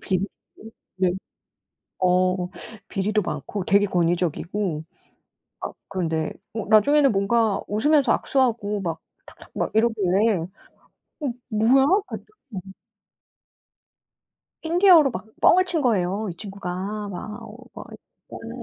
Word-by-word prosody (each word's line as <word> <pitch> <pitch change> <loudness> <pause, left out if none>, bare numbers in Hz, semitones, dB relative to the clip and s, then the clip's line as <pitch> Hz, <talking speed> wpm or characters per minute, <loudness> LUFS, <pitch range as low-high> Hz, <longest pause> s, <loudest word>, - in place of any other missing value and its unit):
비리 190 0 -1 0.3
어 220 - -10 0.3
네 180 -1 +4 0.9
어 185 0 +2 0.4
비리도 210 +1 0
많고 200 0 -4
되게 200 +1 +4
권위적이고 175 -1 -1 0.8
아 - - -4 0.2
그런데 165 -5 -2 0.2
어 220 -2 -4
나중에는 275 +6 +5
뭔가 210 +1 +1
웃으면서 270 +5 +3
악수하고 230 -6 0
막 165 -3 -4 0.2
탁탁 - - -15
막 - - -1
이러길래 215 -2 +2
어 165 0 -4 1.0
뭐야? 235 +5 +4 0.2
아주 - - -6 0.3
네. 205 -6 -5 2.0
힌디어로 335 -3 +5
막 190 -2 -6 0.2
뻥을 370 +1 +6
친 345 -4 0
거예요 210 -4 0
이 - - -11
친구가. 195 -1 -7 0.4
막 210 +4 -7
어 220 -1 -11 0.2
막 - - -10
때 - - -17
하고 225 - -8
210 Hz, 230 characters per minute, -23 LUFS, 185-235 Hz, 2.0 s, 뻥을